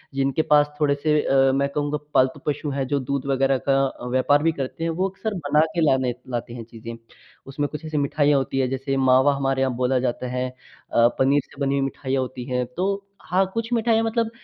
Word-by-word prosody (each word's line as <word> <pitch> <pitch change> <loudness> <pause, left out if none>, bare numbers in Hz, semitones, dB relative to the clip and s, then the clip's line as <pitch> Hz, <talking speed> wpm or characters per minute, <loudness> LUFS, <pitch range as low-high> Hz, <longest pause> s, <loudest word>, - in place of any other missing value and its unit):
जिनके 135 +2 +1
पास 150 0 +5
थोड़े-से 150 +1 +2
अ, 135 0 +3
मैं 140 0 +1
कहूँगा 145 +1 -1 0.2
पालतू 130 0 +3
पशु 150 0 -1
हैं, 135 -1 -1
जो 145 0 0
दूध 135 +1 -3
वगैरह 135 0 +2
का 135 0 +4
अ, 125 - -9
व्यापार 145 +4 +3
भी 165 - +3
करते 140 +2 -5
हैं, 165 - 0
वो 185 +4 -1
अक्सर 215 +3 -4
बना 150 -5 0 0.2
के 170 - +1
लाने 130 -4 +2 0.2
लाते 120 -1 -4
हैं 120 - -7
चीज़ें। 115 0 -9 0.5
उसमें 145 +2 -2
कुछ 155 +1 -7
ऐसी 155 -1 -3
मिठाइयाँ 145 0 +2
होती 135 0 -1
हैं, 130 - +1
जैसे 135 +1 -2
मावा 130 +2 +4
हमारे 135 -1 0
यहाँ 130 -1 +1
बोला 125 +1 +1
जाता 125 +1 -3
है 125 0 -1
अ, 125 -2 -1
पनीर 140 +2 +3
से 140 - -18
बनी 140 0 +1
हुई - - 0
मिठाइयाँ 135 -1 -2
होती 125 -1 -5
हैं। 125 0 0
तो 185 +2 +1 0.4
हाँ, 185 +3 +2
कुछ 230 +1 -3
मिठाइयाँ 225 -1 +2
मतलब 225 0 0
135 Hz, 215 wpm, -23 LUFS, 130-150 Hz, 0.5 s, पास